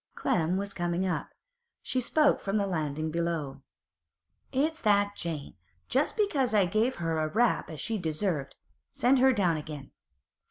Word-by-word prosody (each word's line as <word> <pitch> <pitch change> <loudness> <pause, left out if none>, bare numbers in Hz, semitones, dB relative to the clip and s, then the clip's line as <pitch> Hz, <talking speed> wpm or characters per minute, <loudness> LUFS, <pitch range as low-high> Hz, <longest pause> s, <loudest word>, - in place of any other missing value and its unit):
Clem 175 +2 +1
was 200 0 -3
coming 175 +1 -1
up; 180 - -2 0.5
she 255 - 0
spoke 300 +4 +3
from 200 +2 -1
the 200 - +1
landing 155 -4 -2
below. 160 -5 -2 0.9
'It's 310 +5 0
that 205 -1 +3
Jane, 160 -4 -5 0.4
just - - +1
because 285 - +1
I 200 -3 +5
gave 215 +8 +1
her 165 -2 -1
a 155 - +1
rap 230 +8 +1
as 155 -2 -7
she 225 -2 -2
deserved. 160 -3 -2 0.4
Send 260 +2 +3
her 265 +1 +6
down 180 -9 +2
again. 150 -2 -8
185 Hz, 155 wpm, -29 LUFS, 160-225 Hz, 0.9 s, her